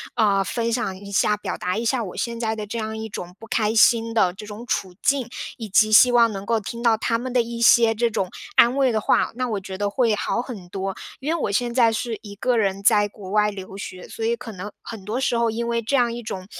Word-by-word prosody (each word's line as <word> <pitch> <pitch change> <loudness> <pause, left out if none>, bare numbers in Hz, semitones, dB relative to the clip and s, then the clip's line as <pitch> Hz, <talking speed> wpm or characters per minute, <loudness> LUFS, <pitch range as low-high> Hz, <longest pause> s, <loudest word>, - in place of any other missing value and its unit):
呃， 200 -4 +3
分 230 +5 -2
享 205 -6 -2
一 200 +1 -10
下， 210 +1 +2
表 - - -4
达 180 +2 -2
一 230 - -2
下 235 +1 +1
我 185 - -8
现 235 -1 -3
在 220 -1 -1
的 215 - -5
这 225 +3 -4
样 220 0 -4
一 220 0 -5
种 180 -4 -8
不 - - -10
开 220 -1 0
心 230 0 +4
的 190 -6 +2
这 210 +3 -10
种 215 +3 -8
处 190 -6 -2
境， 270 -4 +1 0.3
以 225 -3 -7
及 215 +3 +4
希 245 +3 +7
望 235 -2 +5
能 195 -1 -6
够 230 -1 +2
听 235 +3 -7
到 230 -2 +3
他 230 +1 0
们 255 +1 -5
的 245 -2 +3
一 235 0 -6
些 230 -1 +6
这 235 +2 +1
种 190 -4 -2 0.3
安 240 +2 +6
慰 265 -2 +3
的 220 - +1
话， - - +2
那 255 +1 -1
我 210 - -1
觉 190 0 -8
得 205 +1 -1
会 225 0 +2
好 235 - -1
很 215 -9 -8
多。 195 +1 -4 0.2
因 295 +5 -1
为 335 - -2
我 - - 0
现 240 +3 0
在 235 -3 +4
是 225 0 -3
一 200 -1 -10
个 245 +4 0
人 195 -2 0
在 205 -1 +4
国 195 -2 -11
外 210 0 +3
留 195 -1 -9
学， 185 -2 -8
所 225 - -7
以 230 +1 +1
可 230 -1 -9
能 205 +1 -7
很 225 -4 -9
多 225 +4 -2
时 245 -3 +1
候 235 -1 +2
因 235 +1 -3
为 235 0 0
这 230 +5 -1
样 240 -3 +3
一 240 - -5
种， 185 -3 -6
225 Hz, 290 characters per minute, -23 LUFS, 200-235 Hz, 0.3 s, 希